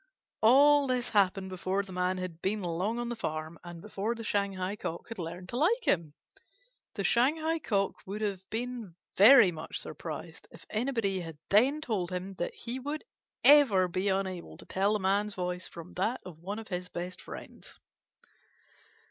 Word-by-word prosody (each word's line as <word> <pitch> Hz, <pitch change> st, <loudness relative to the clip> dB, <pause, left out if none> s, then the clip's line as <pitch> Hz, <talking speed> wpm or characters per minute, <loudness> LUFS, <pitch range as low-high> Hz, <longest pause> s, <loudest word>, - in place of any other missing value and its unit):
All 280 Hz, +5 st, +6 dB
this 250 Hz, -1 st, 0 dB
happened 195 Hz, -2 st, +2 dB
before 185 Hz, +2 st, -1 dB
the 195 Hz, -, -12 dB
Man 180 Hz, 0 st, 0 dB
had 180 Hz, -3 st, -6 dB
been 205 Hz, +1 st, -1 dB
long 180 Hz, +7 st, -1 dB
on 240 Hz, 0 st, -2 dB
the 240 Hz, -, -3 dB
farm, 155 Hz, -5 st, -4 dB
and 175 Hz, -1 st, -9 dB
before 210 Hz, +2 st, -2 dB
the 230 Hz, -, -7 dB
Shanghai 200 Hz, -2 st, -1 dB
Cock 170 Hz, -1 st, -6 dB
had 230 Hz, -, -7 dB
learned 175 Hz, +2 st, -6 dB
to 240 Hz, -, -3 dB
like 445 Hz, -, +2 dB
him. 160 Hz, -4 st, +1 dB, 0.8 s
The 200 Hz, -, -2 dB
Shanghai 310 Hz, -, +2 dB
Cock 200 Hz, -9 st, 0 dB
would 205 Hz, +3 st, -5 dB
have 200 Hz, -3 st, -1 dB
been 235 Hz, -5 st, -4 dB, 0.2 s
very 220 Hz, -1 st, +8 dB
much 155 Hz, -2 st, -6 dB
surprised -, -, -7 dB
if -, -, -15 dB
anybody 220 Hz, -5 st, 0 dB
had 165 Hz, -3 st, -7 dB
then 260 Hz, +9 st, +4 dB
told 205 Hz, -, -1 dB
him 185 Hz, +1 st, -4 dB
that 175 Hz, -, -2 dB
he 245 Hz, +2 st, -5 dB
would 290 Hz, +4 st, -4 dB, 0.4 s
ever 265 Hz, -11 st, +7 dB
be 185 Hz, +3 st, -1 dB
unable 190 Hz, -2 st, -2 dB
to -, -, -13 dB
tell 200 Hz, +2 st, +1 dB
the 215 Hz, -, +1 dB
Man's 200 Hz, +2 st, +1 dB
voice 180 Hz, 0 st, -3 dB
from 170 Hz, +1 st, -10 dB
that 220 Hz, +8 st, 0 dB
of 175 Hz, -4 st, -10 dB
one 195 Hz, +5 st, -5 dB
of 225 Hz, -1 st, -8 dB
his 180 Hz, -1 st, -4 dB
best 180 Hz, +1 st, -6 dB
friends. -, -, -11 dB
195 Hz, 175 wpm, -30 LUFS, 180-235 Hz, 0.8 s, very